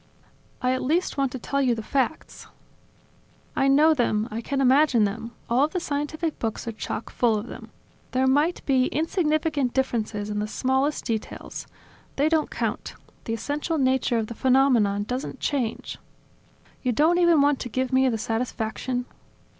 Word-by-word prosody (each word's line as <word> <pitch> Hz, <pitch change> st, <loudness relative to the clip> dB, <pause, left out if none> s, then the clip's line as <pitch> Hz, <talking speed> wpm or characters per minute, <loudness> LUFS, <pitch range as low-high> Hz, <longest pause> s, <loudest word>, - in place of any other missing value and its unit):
"I 250 Hz, -, +3 dB
at 260 Hz, -, 0 dB
least 320 Hz, +7 st, 0 dB
want 275 Hz, -2 st, 0 dB
to -, -, -3 dB
tell 275 Hz, +3 st, -1 dB
you 250 Hz, -3 st, +2 dB
the 220 Hz, -, -5 dB
facts." 275 Hz, +5 st, -2 dB, 1.1 s
"I 270 Hz, -, +2 dB
know 300 Hz, +4 st, +5 dB
them, 225 Hz, -5 st, +1 dB
I 225 Hz, +2 st, -3 dB
can 275 Hz, +4 st, -2 dB
imagine 265 Hz, -2 st, +4 dB
them; 215 Hz, +3 st, -2 dB, 0.2 s
all 245 Hz, +4 st, +3 dB
of 310 Hz, -, -7 dB
the 365 Hz, -, 0 dB
scientific 305 Hz, +1 st, -3 dB
books 225 Hz, 0 st, -3 dB
are -, -, -1 dB
chock 220 Hz, 0 st, -5 dB
full 230 Hz, -3 st, +2 dB
of 210 Hz, -, -4 dB
them. -, -, -10 dB, 0.4 s
There 260 Hz, +1 st, +1 dB
might 290 Hz, +6 st, +2 dB
be 260 Hz, -2 st, +3 dB
insignificant 310 Hz, -4 st, 0 dB
differences 215 Hz, -5 st, -1 dB
in 210 Hz, -, -2 dB
the 210 Hz, -, -2 dB
smallest 265 Hz, +6 st, 0 dB
details... 225 Hz, -3 st, -5 dB, 0.5 s
they 290 Hz, +3 st, +2 dB
don't 315 Hz, -1 st, +1 dB
count. -, -, -3 dB, 0.3 s
The 225 Hz, -, -1 dB
essential 295 Hz, +7 st, -2 dB
nature 260 Hz, -3 st, +2 dB
of 225 Hz, -, 0 dB
the 235 Hz, -, -7 dB
phenomenon 245 Hz, -6 st, +3 dB
doesn't 250 Hz, +5 st, -4 dB
change." 255 Hz, -6 st, -2 dB, 0.8 s
"You 250 Hz, -2 st, 0 dB
don't 320 Hz, +8 st, +3 dB
even 345 Hz, -3 st, +5 dB
want 285 Hz, -1 st, +3 dB
to 245 Hz, -, -5 dB
give 255 Hz, +2 st, -2 dB
me 260 Hz, 0 st, +4 dB
the 225 Hz, -, -1 dB
satisfaction 230 Hz, +2 st, -2 dB
260 Hz, 170 wpm, -25 LUFS, 230-290 Hz, 1.1 s, know